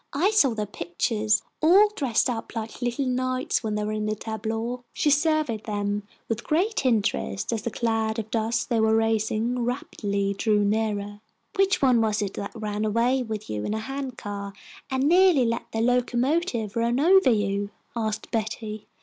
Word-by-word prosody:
"I 355 +9 +2
saw 275 - +4
their 210 -1 -2
pictures, 210 +4 0 0.2
all 380 +7 +6
dressed 255 -7 +1
up 235 -1 -4
like 225 +2 -5
little 245 +3 -1
knights 255 0 0
when 215 -1 -1
they 210 - -1
were 210 - -2
in 215 0 -2
the 215 - 0
tableaux." 225 +3 -4
She 295 - +2
surveyed 295 -7 +1
them 205 -1 -2 0.2
with 225 +1 -2
great 350 -1 +1
interest 220 -2 0
as 225 - -2
the 235 - -2
cloud 225 -1 -1
of 220 -1 -5
dust 225 +1 0
they 235 -2 +2
were 220 0 +3
raising 225 +2 +1
rapidly 200 -5 -2
drew 210 0 +2
nearer. 205 -1 -1 0.3
"Which 390 -5 +2
one 250 -3 +5
was 215 -1 +1
it 195 - -4 0.2
ran 210 -1 -3
away 235 +5 +2
with 220 -3 -5
you 105 -1 -3
in 215 - -2
a - - -2
hand 270 +2 -5
car, 200 -1 -6 0.4
and 265 -1 0
nearly 350 -5 +5
let 230 +1 -2
the 225 - -1
locomotive 245 - +1
run 235 +2 +1
over 370 +1 +5
you?" 200 -2 0 0.3
asked 220 -2 -3
Betty. 220 -1 -3
225 Hz, 175 wpm, -25 LUFS, 215-255 Hz, 0.4 s, all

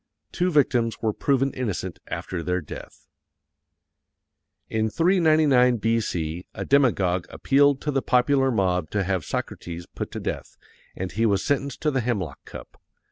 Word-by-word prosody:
Two 180 0 0
victims 125 -7 +2
were 110 -2 0
proven 135 +2 +1
innocent 95 -7 -4
after 90 -2 -4
their 90 +3 -1
death. 80 - -11 1.6
IN 110 0 0
399 155 - +4
B.C. 90 -7 -1
A - - -4
DEMAGOG 100 -11 +2
APPEALED 140 0 +3
TO 150 - -2
THE 135 -1 0
POPULAR 135 +2 +3
MOB 90 -8 0
TO 105 -2 0
HAVE 95 -3 -1
SOCRATES 85 +3 -5
PUT - - -4
TO - - -5
DEATH - - -5 0.4
_and 95 0 -4
he 115 +3 +1
was 100 -2 +1
sentenced 140 -1 -1
to 155 - +2
the 135 -2 0
hemlock 105 - -3
cup. - - -11
115 Hz, 145 wpm, -24 LUFS, 95-140 Hz, 1.6 s, 399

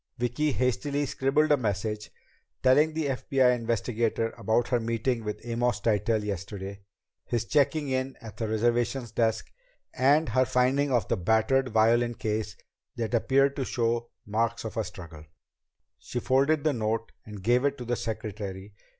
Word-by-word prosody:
Vicki 125 +5 0
hastily 140 +3 0
scribbled 140 +3 +1
a 145 - +6
message, 105 -2 -2 0.5
telling 150 +5 +4
the 160 -1 -1
FBI 130 -2 +2
investigator 115 -1 -1
about 110 +3 0
her 125 - +2
meeting 115 +1 -1
with 105 +2 -5
Amos 120 +1 0
Tytell 110 0 +1
yesterday; 100 0 -5 0.4
his 115 -2 -1
checking 145 +2 +2
in 130 0 -2
at 110 -4 -11
the 110 - -2
reservations 120 +2 0
desk; 110 -1 0 0.4
and 145 +3 +3
her 130 +3 +3
finding 130 +3 +2
of 120 -3 +1
the - - 0
battered 110 +8 +2
violin 120 +2 +3
case 105 -1 -3 0.4
that 115 0 -3
appeared 135 +4 +3
to 135 - 0
show 120 -1 -1 0.2
marks 115 +2 -1
of 110 -1 -5
a 110 - 0
struggle. 85 -7 -10 0.8
She 125 - -4
folded 140 +5 +2
the 155 -2 +2
note 115 -1 -2
and 105 -3 -10
gave 120 +4 +3
it 140 0 +1
to 125 - -7
the 120 +1 0
secretary. 105 -3 -5
120 Hz, 155 wpm, -27 LUFS, 110-130 Hz, 0.8 s, a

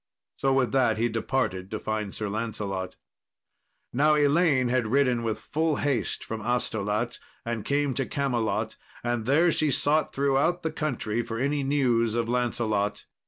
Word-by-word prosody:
So 135 - +1
with 130 -2 +2
that 130 -4 +3
he 120 +2 +1
departed 110 -5 -1
to 110 - -4
find 110 -2 -3
Sir 105 - -3
Lancelot. 100 -3 -3 1.0
Now 150 +4 +4
Elaine 145 -3 +3
had 125 -2 +1
ridden 125 -1 +2
with 115 -2 -2
full 160 0 0
haste 130 -11 -1
from 110 0 -5
Astolat, 110 -1 -1 0.3
and 115 -2 -3
come 140 +2 +1
to 135 0 -2
Camelot, 125 -6 -1 0.3
and 120 -2 -1
there 165 +6 +4
she 155 -1 +2
sought 150 +3 +2
throughout 140 +6 +1
the 160 - -1
country 120 -8 -2
for 115 -1 -5
any 140 +4 0
news 125 -5 +2
of 120 -1 0
Lancelot. 115 -4 -1
120 Hz, 155 wpm, -27 LUFS, 110-140 Hz, 1.0 s, Now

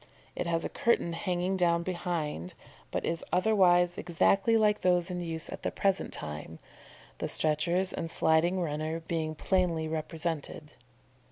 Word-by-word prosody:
It - - -2
has 165 -1 0
a - - -2
curtain 230 -7 +1
hanging 180 +2 -1
down 170 -2 +2
behind, 170 - -3 0.3
but - - -2
is 165 0 -2
otherwise 180 -3 +4
exactly 195 +6 +3
like 210 -1 +3
those 180 -1 +2
in 180 0 -3
use 165 -1 -4
at - - -7
the - - -1
present 195 -1 0
time, 75 +1 -7 0.6
the - - -2
stretchers 170 +5 +1
and 165 - -4
sliding 165 +4 +2
runner 155 -1 -2
being 160 -1 -3
plainly 170 -2 +1
represented. 155 -1 -4
170 Hz, 145 wpm, -30 LUFS, 160-180 Hz, 0.6 s, otherwise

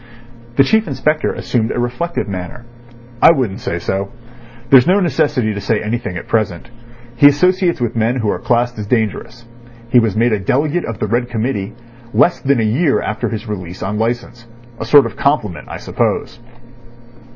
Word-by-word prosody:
The 135 - +6
Chief 220 +10 +2
Inspector 150 +2 0
assumed 115 -2 -1
a - - -3
reflective 120 +6 -2
manner. 95 +5 -6 0.6
"I - - +8
wouldn't 125 -11 -1
say 85 - -3
so. 95 +3 -3 0.6
There's 130 -2 +7
no 190 +3 +4
necessity 145 - 0
to 100 - -5
say 105 +2 0
anything 110 -4 -3
at - - -8
present. 110 -1 -2 0.4
He 145 +4 +7
associates 180 +4 +2
with 120 -2 -2
men 115 +2 +1
who 110 -5 0
are - - -3
classed 120 -1 0
as 105 - -5
dangerous. 115 +1 -2 0.5
He 125 - +6
was 115 -4 0
made 115 0 +2
a 105 - 0
delegate 145 - 0
of 115 -3 -5
the - - -2
Red 120 +3 -1
Committee 110 -3 -3 0.4
less 175 - +3
than 135 -2 +1
a - - +1
year 135 +8 +2
after 110 - -3
his 110 0 -5
release 90 -4 -6
on 105 +2 -3
licence. 120 +1 -3 0.3
A - - -4
sort 140 +3 +6
of 115 - -5
compliment, 105 - -1
I - - -6
suppose." 115 - -2
120 Hz, 180 wpm, -17 LUFS, 105-135 Hz, 0.6 s, I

